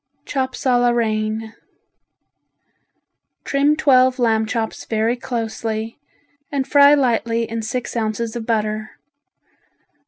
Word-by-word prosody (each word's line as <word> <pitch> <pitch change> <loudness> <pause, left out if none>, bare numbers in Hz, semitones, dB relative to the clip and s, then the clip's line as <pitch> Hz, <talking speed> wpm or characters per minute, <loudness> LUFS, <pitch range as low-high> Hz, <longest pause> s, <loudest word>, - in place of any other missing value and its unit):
Chops 265 -1 -3
a 250 -2 +4
la 245 0 +3
Reine 220 -1 -1 1.9
Trim 285 +2 +2
twelve 255 -3 +4
lamb 220 -3 +1
chops 225 -1 -3
very 225 +2 0
closely 225 -2 -4 0.5
and 275 -2 -1
fry 285 +1 +6
lightly 230 -4 0
in 225 0 -4
six 240 +3 -4
ounces 220 0 -2
of 230 -2 -5
butter. 215 -1 -2
230 Hz, 105 wpm, -20 LUFS, 220-255 Hz, 1.9 s, fry